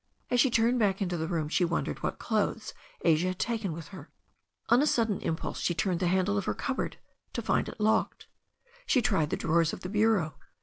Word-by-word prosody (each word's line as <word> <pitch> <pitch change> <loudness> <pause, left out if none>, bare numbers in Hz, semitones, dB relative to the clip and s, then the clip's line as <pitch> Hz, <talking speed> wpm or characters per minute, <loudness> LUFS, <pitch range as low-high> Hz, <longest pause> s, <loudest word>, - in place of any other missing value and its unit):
As 245 - +3
she 270 - +4
turned 235 +1 +2
back 195 -3 +2
into 180 -3 -1
the 160 -1 -2
room 165 -3 -1
she 175 +4 +1
wondered 170 -1 -1
what - - -2
clothes 220 0 -1 0.3
Asia 165 +1 +3
had 185 0 -2
taken 220 -5 -1
with 160 -1 -7
her. 175 -6 -11 0.6
On 240 +3 +6
a 300 - +2
sudden 225 -7 +1
impulse 160 - -3
she 175 - 0
turned 180 -1 0
the 180 - +1
handle 190 +3 +2
of 200 - -5
her - - -1
cupboard, 270 - -3 0.4
to - - -2
find - - +1
it - - -11
locked. 215 +1 +1 0.6
She 260 - +4
tried 195 -11 +1
the - - -1
drawers 165 0 +2
of - - -7
the 180 - -5
bureau. 205 -8 +1
190 Hz, 215 wpm, -29 LUFS, 170-220 Hz, 0.6 s, On